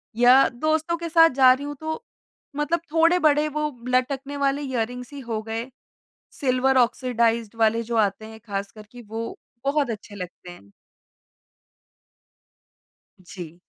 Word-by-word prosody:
या 250 +3 +6
दोस्तों 315 +6 -1
के 335 0 -5
साथ 330 0 +6
जा 255 -1 +8
रही 280 +2 -5
हूँ 290 - -5
तो 315 +9 -4 0.5
मतलब 295 +3 0
थोड़े 330 +2 +4
बड़े 300 -2 +3
वो 300 0 -1 0.2
लटकने 270 +3 -1
वाले 280 0 0
इयररिंग्स 250 -1 -4
ही 285 - -7
हो 225 -3 -4
गए, 225 +3 -5 0.6
सिल्वर 260 0 +1
ऑक्सिडाइज्ड 235 -2 +1
वाले 225 +1 +3
जो 230 0 -3
आते 215 0 +1
हैं 220 0 -12
खासकर 200 +1 -5
के 245 -1 -11
वो 225 +1 -5 0.3
बहुत 280 -2 +1
अच्छे 210 -1 -7
लगते 180 -1 -9
हैं। 100 - -15 2.5
जी। 175 -2 -10
250 Hz, 140 wpm, -24 LUFS, 225-290 Hz, 2.5 s, जा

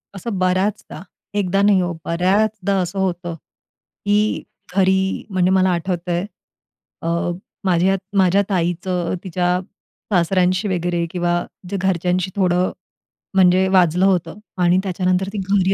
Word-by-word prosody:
असं 195 +1 -4
बऱ्याचदा, 185 +1 -1 0.3
एकदा 195 -1 +1
नाही 200 -2 +4
हो, 175 -1 -1
बऱ्याचदा 195 +3 +1
असं 180 +2 -3
होतं, 175 -2 -2
की 205 +6 -3 0.3
घरी, 190 0 +2
म्हणजे 185 -1 +2
मला 190 0 +4
आठवतंय 175 0 -1 0.8
अ, 165 - -4 0.6
माझ्या 185 +1 +3 0.2
माझ्या 190 +1 +4
ताईचं, 175 0 -1
तिच्या 180 0 0 0.5
सासऱ्यांशी 185 +2 +2
वगैरे 175 -2 -1
किंवा 175 -1 0 0.4
जे 200 - -2
घरच्यांशी 185 0 0
थोडं, 180 -1 +2 0.6
म्हणजे 185 0 +5
वाजलं 180 -1 +3
होतं. 190 +1 +1 0.2
आणि 180 0 +3
त्याच्यानंतर 185 0 0
ती - - -4
घरी 195 -1 +3
185 Hz, 120 wpm, -20 LUFS, 175-195 Hz, 0.8 s, म्हणजे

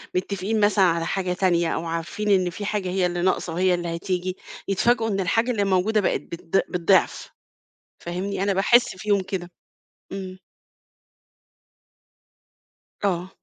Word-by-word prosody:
متفقين 200 +3 -1
مثلًا 205 -2 +4
على 170 -1 +1
حاجة 185 0 -1
تانية 175 -2 +1
أو 165 - -3
عارفين 165 +6 -3
إن 185 -3 +3
في 205 +4 -6
حاجة 200 -3 -2
هي 185 0 +1
اللي 175 0 -1
ناقصة، 180 -2 0
هي 185 0 +3
اللي 175 -1 -2
هتيجي، 185 +1 -3 0.3
يتفاجئوا 225 +4 +2
إن 195 -2 -1
الحاجة 225 +7 +1
اللي 210 -4 0
موجودة 195 +3 +2
بقِت 185 - 0
بالض 170 +4 -1
بالضعف، 180 +1 +2 0.7
فاهمني؟ 185 +3 -4
أنا 200 0 +2
باحس 210 +3 +3
فيهم 205 0 +1
كده. 180 -2 -5 0.6
إمم. 190 -1 -6 2.6
آه. 185 -2 0
185 Hz, 140 wpm, -24 LUFS, 175-200 Hz, 2.6 s, مثلًا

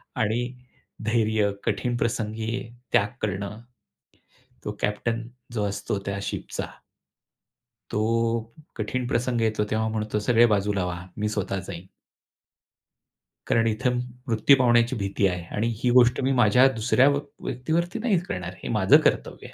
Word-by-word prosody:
आणि 110 +2 +1 0.6
धैर्य, 110 -2 +2
कठीण 120 -1 -1
प्रसंगी 110 0 -2 0.2
त्याग 105 -4 +4
करणं, 100 +2 -3 1.0
तो 105 - -2
कॅप्टन 115 +2 -1 0.3
जो 105 -3 -1
असतो 100 0 -3
त्या 100 0 -2
शिपचा. - - -4 1.2
तो 115 +1 +1 0.3
कठीण 120 +3 -2
प्रसंग 120 -1 0
येतो 110 -1 +1
तेव्हा 110 0 +1
म्हणतो, 110 -1 -2
"सगळे 120 +2 +4
बाजूला 100 -3 +1
व्हा, 90 0 -5
मी 105 0 -1
स्वतः 100 -2 -2
जाईन." 90 -1 -7 1.6
कारण 115 0 +3
इथं 115 +3 0
म 125 - 0 0.3
मृत्यू 115 +5 +5
पावण्याची 120 0 +4
भीती 100 -1 0
आहे 90 -2 -3
आणि 110 +3 0 0.2
ही 125 - +3
गोष्ट 125 +1 +5
मी 135 +1 +1
माझ्या 125 +5 +6
दुसऱ्या 125 +4 +3
व 140 - +1 0.3
व्यक्तीवरती 165 - -1
नाही 215 -6 +2
करणार. 90 -1 -4
हे - - -4
माझं - - +6
कर्तव्य - - -1
आहे. - - -15
110 Hz, 140 wpm, -25 LUFS, 105-120 Hz, 1.6 s, माझ्या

